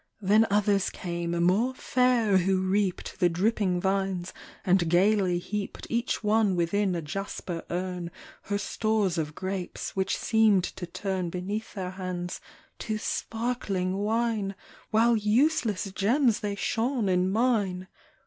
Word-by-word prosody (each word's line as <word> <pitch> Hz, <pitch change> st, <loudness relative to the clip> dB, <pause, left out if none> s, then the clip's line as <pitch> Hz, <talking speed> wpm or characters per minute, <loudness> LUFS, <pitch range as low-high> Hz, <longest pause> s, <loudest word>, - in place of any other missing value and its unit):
Then 215 Hz, +2 st, +4 dB
others 200 Hz, -1 st, +2 dB
came, 170 Hz, -1 st, -3 dB
more 220 Hz, +9 st, +2 dB
fair, 250 Hz, -6 st, +2 dB
who 190 Hz, +1 st, +1 dB
reaped 190 Hz, -1 st, -1 dB
The 180 Hz, -2 st, +4 dB
dripping 185 Hz, +1 st, +1 dB
vines, 190 Hz, -1 st, -1 dB, 0.3 s
and 180 Hz, -3 st, +3 dB
gayly 185 Hz, 0 st, +3 dB
heaped 200 Hz, +3 st, -5 dB
Each 235 Hz, -1 st, -1 dB
one 210 Hz, -2 st, +3 dB
within 180 Hz, +2 st, +1 dB
a 170 Hz, -, -3 dB
jasper 175 Hz, +1 st, -5 dB
urn 180 Hz, -1 st, -3 dB, 0.4 s
Her 205 Hz, -, -1 dB
stores 205 Hz, -3 st, 0 dB
of 150 Hz, -1 st, -3 dB
grapes, 190 Hz, -1 st, -4 dB
which 190 Hz, 0 st, 0 dB
seemed 220 Hz, -5 st, +3 dB
to 175 Hz, 0 st, -5 dB
turn 185 Hz, 0 st, -3 dB
Beneath 200 Hz, +6 st, -4 dB
their 185 Hz, -2 st, -4 dB
hands 185 Hz, -2 st, -5 dB, 0.4 s
to 215 Hz, -1 st, -2 dB
sparkling 215 Hz, -5 st, -2 dB
wine. 215 Hz, -1 st, 0 dB, 0.3 s
While 230 Hz, +2 st, +4 dB
useless 215 Hz, -2 st, +1 dB
gems 230 Hz, +5 st, +2 dB
they 205 Hz, -1 st, -3 dB
shone 230 Hz, +2 st, 0 dB
in 185 Hz, 0 st, +2 dB
mine. 205 Hz, -5 st, +1 dB
195 Hz, 130 wpm, -27 LUFS, 180-220 Hz, 0.4 s, Then